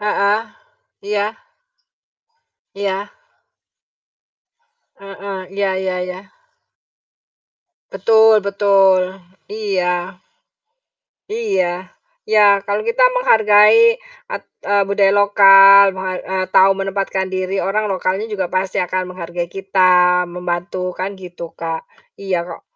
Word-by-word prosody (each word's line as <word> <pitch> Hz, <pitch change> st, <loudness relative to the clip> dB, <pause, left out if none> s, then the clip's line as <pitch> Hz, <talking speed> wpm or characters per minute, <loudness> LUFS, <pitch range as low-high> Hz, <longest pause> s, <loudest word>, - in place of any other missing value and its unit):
Heeh, 210 Hz, +1 st, 0 dB, 0.7 s
iya. 205 Hz, -1 st, 0 dB, 1.5 s
Iya. 200 Hz, 0 st, -4 dB, 1.9 s
Heeh, 195 Hz, -1 st, -8 dB
iya 200 Hz, -1 st, -1 dB
iya 185 Hz, -1 st, -3 dB
iya. 185 Hz, +1 st, -7 dB, 1.7 s
Betul 220 Hz, -2 st, +4 dB
betul, 195 Hz, -2 st, +2 dB, 0.4 s
iya, 185 Hz, -3 st, -3 dB, 1.1 s
iya. 190 Hz, -, -2 dB, 0.3 s
Ya, 205 Hz, -, +3 dB
kalau 205 Hz, +1 st, -3 dB
kita 465 Hz, +2 st, 0 dB, 0.2 s
menghargai, 220 Hz, -, +4 dB, 0.3 s
at -, -, -7 dB, 0.2 s
eee, 205 Hz, 0 st, +1 dB
budaya 200 Hz, 0 st, +2 dB
lokal, 200 Hz, -1 st, +6 dB
meha 185 Hz, -1 st, -6 dB
eee, 190 Hz, 0 st, -3 dB
tau 190 Hz, +1 st, +6 dB
menempatkan 195 Hz, 0 st, -2 dB
diri, 185 Hz, +1 st, -4 dB
orang 210 Hz, +2 st, -2 dB
lokalnya 190 Hz, +3 st, -3 dB
juga 195 Hz, -4 st, -3 dB
pasti 185 Hz, +1 st, -3 dB
akan 185 Hz, 0 st, -3 dB
menghargai 175 Hz, -1 st, -6 dB
kita, 185 Hz, -2 st, +2 dB
membantu, 180 Hz, +1 st, -5 dB
kan 190 Hz, +1 st, -6 dB
gitu, 175 Hz, -2 st, -10 dB
Kak. 165 Hz, -1 st, -4 dB, 0.3 s
Iya, 185 Hz, -3 st, -4 dB
kok -, -, -10 dB
195 Hz, 100 wpm, -17 LUFS, 185-205 Hz, 1.9 s, lokal